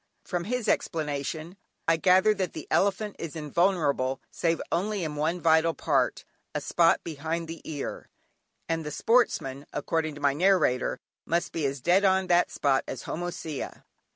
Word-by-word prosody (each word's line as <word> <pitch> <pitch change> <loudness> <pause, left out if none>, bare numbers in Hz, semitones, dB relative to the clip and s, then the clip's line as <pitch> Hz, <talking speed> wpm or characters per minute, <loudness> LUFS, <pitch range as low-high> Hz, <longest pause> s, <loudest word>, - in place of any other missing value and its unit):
From 175 -2 -2
his 245 +1 -2
explanation, 155 +2 -2 0.3
I 165 - +5
gathered 190 +4 +4
that 185 -3 -1
the 155 - -7
elephant 200 +1 +1
is 165 -2 -6
invulnerable 150 -4 +1
save 165 -1 0
only 195 +3 0
in 155 -2 -3
one 160 +4 0
vital 160 0 +3
part, 135 -5 0 0.3
a - - +1
spot 170 -1 +3
behind 165 +2 -3
the 165 0 -7
ear, 145 -3 -5 0.6
and 165 -1 -1
the 150 - -4
sportsman 150 - +1
(according 155 +1 -1
to - - -9
my 140 -1 +3
narrator) 155 -6 +2 0.3
must 170 +1 0
be 155 -4 0
as 135 -1 -4
dead 180 +6 +4
on 190 -1 +3
that 175 -1 +3
spot 135 -2 +1
as 130 - -5
"Homocea." 165 -3 -5
165 Hz, 155 wpm, -27 LUFS, 150-180 Hz, 0.6 s, I